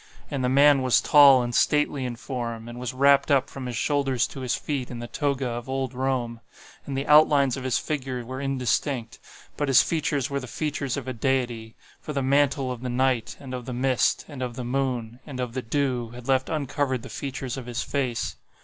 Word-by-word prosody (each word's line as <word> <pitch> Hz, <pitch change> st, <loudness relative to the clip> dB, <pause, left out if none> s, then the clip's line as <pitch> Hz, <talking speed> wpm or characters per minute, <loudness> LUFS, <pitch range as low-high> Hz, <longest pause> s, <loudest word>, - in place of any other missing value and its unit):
And 140 Hz, -3 st, -2 dB
the 125 Hz, -, +2 dB
man 140 Hz, +1 st, +5 dB
was 130 Hz, -2 st, +4 dB
tall 140 Hz, -4 st, +7 dB
and 120 Hz, 0 st, -4 dB
stately 150 Hz, 0 st, +2 dB
in 120 Hz, -1 st, -4 dB
form, 115 Hz, -2 st, -5 dB
and 120 Hz, +1 st, -8 dB
was 125 Hz, -1 st, -3 dB
wrapped 140 Hz, +2 st, +4 dB
up 135 Hz, -2 st, +2 dB
from 130 Hz, -2 st, -6 dB
his 120 Hz, -2 st, -4 dB
shoulders 135 Hz, -3 st, +1 dB
to -, -, -9 dB
his 130 Hz, -2 st, -1 dB
feet 140 Hz, -4 st, -3 dB
in 125 Hz, -, -6 dB
the 120 Hz, -, -6 dB
toga 140 Hz, +1 st, -1 dB
of 120 Hz, +1 st, -5 dB
old 135 Hz, 0 st, -2 dB
Rome. 125 Hz, -3 st, -2 dB, 0.5 s
And 135 Hz, -1 st, -3 dB
the 135 Hz, -, -2 dB
outlines 145 Hz, -3 st, +5 dB
of 130 Hz, -, -6 dB
his 130 Hz, -2 st, +1 dB
figure 130 Hz, -5 st, -3 dB
were 130 Hz, +2 st, -6 dB
indistinct—but 135 Hz, +1 st, -3 dB
his 135 Hz, -, +6 dB
features 145 Hz, -5 st, -1 dB
were 140 Hz, -1 st, -2 dB
the 130 Hz, -, -8 dB
features 145 Hz, -1 st, -3 dB
of -, -, -5 dB
a 130 Hz, -, -2 dB
deity; 120 Hz, -2 st, -1 dB, 0.2 s
for 150 Hz, -, -6 dB
the 140 Hz, -1 st, -1 dB
mantle 140 Hz, -1 st, +2 dB
of 125 Hz, -2 st, -6 dB
the 125 Hz, -, -3 dB
night, 125 Hz, -1 st, 0 dB
and 130 Hz, -2 st, -8 dB
of 125 Hz, -2 st, -5 dB
the 125 Hz, -, -4 dB
mist, 130 Hz, +1 st, +1 dB
and 145 Hz, -4 st, -8 dB
of 125 Hz, -2 st, -3 dB
the 125 Hz, -, -5 dB
moon, 125 Hz, -2 st, -2 dB
and 135 Hz, -3 st, -7 dB
of 125 Hz, -2 st, -3 dB
the 130 Hz, -, -2 dB
dew, 125 Hz, -1 st, -1 dB
had 125 Hz, -1 st, -10 dB
left 130 Hz, -1 st, +2 dB
uncovered 140 Hz, -4 st, -1 dB
the -, -, -8 dB
features 130 Hz, -2 st, -5 dB
of 130 Hz, -2 st, -7 dB
his 120 Hz, -1 st, -3 dB
face. 120 Hz, -, -2 dB
130 Hz, 215 wpm, -25 LUFS, 125-140 Hz, 0.5 s, tall